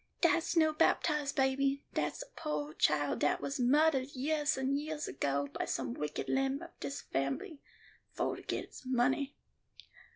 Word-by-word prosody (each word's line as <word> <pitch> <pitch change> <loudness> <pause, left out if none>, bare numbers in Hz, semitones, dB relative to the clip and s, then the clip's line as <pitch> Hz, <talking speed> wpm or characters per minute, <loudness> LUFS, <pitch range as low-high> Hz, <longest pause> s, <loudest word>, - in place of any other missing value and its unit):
Dat's 340 0 +3
no 315 -1 +5
baptized 300 -2 +2
baby; 275 0 +2
dat's 150 0 -1
a - - -15
poo' 150 0 -3
child 145 -2 +2
dat 145 - +2
was 275 0 -3
muhdard 270 +1 +4
yeahs 295 +2 +1
and 265 +2 +1
yeahs 310 0 -4
ago 140 0 -1
by - - -2
some 125 -3 -2
wicked 150 +3 -3
limb 270 +1 +1
of 340 - -10
dis 275 - -4
fambly, 140 - -2 0.5
fo' - - -1
to - - -8
get - - -2
its - - -12
money. 260 +3 +1
270 Hz, 160 wpm, -33 LUFS, -, 0.5 s, no